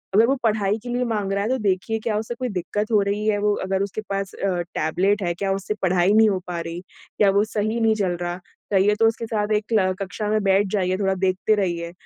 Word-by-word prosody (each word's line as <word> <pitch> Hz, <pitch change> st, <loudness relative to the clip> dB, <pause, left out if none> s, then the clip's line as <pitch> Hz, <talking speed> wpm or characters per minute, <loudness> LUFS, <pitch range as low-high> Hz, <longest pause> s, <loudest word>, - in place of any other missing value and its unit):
अगर 220 Hz, +3 st, +6 dB
वो 270 Hz, -, +2 dB
पढ़ाई 210 Hz, -2 st, +1 dB
के 245 Hz, -, -7 dB
लिए 245 Hz, +1 st, 0 dB
माँग 210 Hz, -4 st, -2 dB
रहा 200 Hz, 0 st, 0 dB
है 215 Hz, -, -1 dB
तो 260 Hz, -, +1 dB
देखिए 195 Hz, +2 st, 0 dB
क्या 220 Hz, -1 st, -2 dB
उससे 220 Hz, +2 st, -4 dB
कोई 250 Hz, +1 st, -3 dB
दिक्कत 205 Hz, +3 st, -3 dB
हो 210 Hz, -2 st, +4 dB
रही 200 Hz, +1 st, -1 dB
है, 210 Hz, -1 st, +2 dB
वो 210 Hz, 0 st, +2 dB
अगर 190 Hz, 0 st, -1 dB
उसके 200 Hz, +2 st, -4 dB
पास 195 Hz, -1 st, -3 dB
अ, 185 Hz, -3 st, -1 dB
टैबलेट 190 Hz, +6 st, +1 dB
है 175 Hz, -1 st, 0 dB
क्या 195 Hz, +3 st, -2 dB
उससे 195 Hz, +2 st, -3 dB
पढ़ाई 185 Hz, +1 st, +3 dB
नहीं 220 Hz, 0 st, +6 dB
हो 190 Hz, -2 st, 0 dB
पा 175 Hz, -1 st, -3 dB
रही, 165 Hz, +1 st, -6 dB, 0.4 s
क्या 205 Hz, -, +5 dB
वो 200 Hz, +1 st, +3 dB
सही 215 Hz, +1 st, -2 dB
नहीं 225 Hz, -1 st, +3 dB
चल 185 Hz, -4 st, -1 dB
रहा। 175 Hz, +1 st, -3 dB, 0.3 s
चाहिए 200 Hz, +1 st, +4 dB
तो 225 Hz, -, +5 dB
उसके 225 Hz, +1 st, -1 dB
साथ 215 Hz, -1 st, -2 dB
एक 210 Hz, -, 0 dB
क्ल 190 Hz, -5 st, +2 dB
कक्षा 200 Hz, +2 st, -4 dB
में 215 Hz, 0 st, +1 dB
बैठ 195 Hz, +1 st, +3 dB
जाइए, 185 Hz, -3 st, +1 dB
थोड़ा 195 Hz, -1 st, +1 dB
देखते 190 Hz, +3 st, +1 dB
रहिए, 170 Hz, -4 st, -2 dB
200 Hz, 250 wpm, -23 LUFS, 190-215 Hz, 0.4 s, अगर